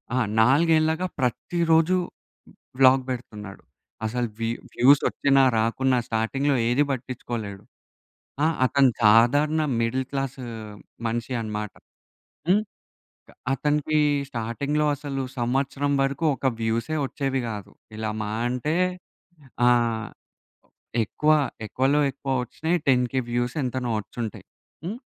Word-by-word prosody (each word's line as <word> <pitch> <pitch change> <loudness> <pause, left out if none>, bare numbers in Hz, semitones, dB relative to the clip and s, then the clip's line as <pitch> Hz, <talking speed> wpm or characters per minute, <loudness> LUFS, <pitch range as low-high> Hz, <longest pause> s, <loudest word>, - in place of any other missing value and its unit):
ఆహ్, 125 -4 +1
నాలుగేళ్లగా 160 +7 +3
ప్రతిరోజూ 165 +7 +2 0.8
వ్లాగ్ 130 0 +6
పెడుతున్నాడు. 105 -5 -7 0.4
అసలు 120 +2 -1
వ్యూ 115 +1 -1 0.2
వ్యూస్ 140 +3 +5
వచ్చినా 135 -1 +3 0.2
రాకున్నా 125 +4 +1
స్టార్టింగ్‌లో 135 +6 0
ఏది 130 +4 +3
పట్టించుకోలేడు. 120 -5 -5 0.8
ఆహ్, 160 0 +1
అతను 135 +1 +4
సాధారణ 140 +9 +5 0.2
మిడిల్ 130 +3 0
క్లాస్ 135 -1 -3 0.7
మనిషి 120 +2 -3
అన్నమాట. 105 -2 -4 0.8
హ్మ్. 200 +3 +5 0.9
అతనికి 150 +2 0 0.3
స్టార్టింగ్‌లో 140 +5 -1
అసలు 135 -1 -4 0.2
సంవత్సరం 135 +3 0
వరకు 140 +4 -1
ఒక 135 - -1
వ్యూసే 115 +7 -1
వచ్చేవి 135 0 -2
కాదు. 105 -3 -7 0.3
ఇలా 110 0 -2
మాహా 105 +1 -3
అంటే 125 +6 -1 0.9
ఆహ్, 115 -2 +2 1.0
ఎక్కువ 155 +7 +1 0.3
ఎక్కువలో 135 +6 +2
ఎక్కువ 135 0 -4
వచ్చినాయి 160 +7 -1
10000 125 0 +2
వ్యూస్ 120 +3 -1
ఎంతనో 125 -1 -2
వచ్చి - - -17
ఉంటాయి. 110 - -7 0.4
హ్మ్. 210 +6 -4
130 Hz, 105 wpm, -25 LUFS, 115-145 Hz, 1.0 s, వ్లాగ్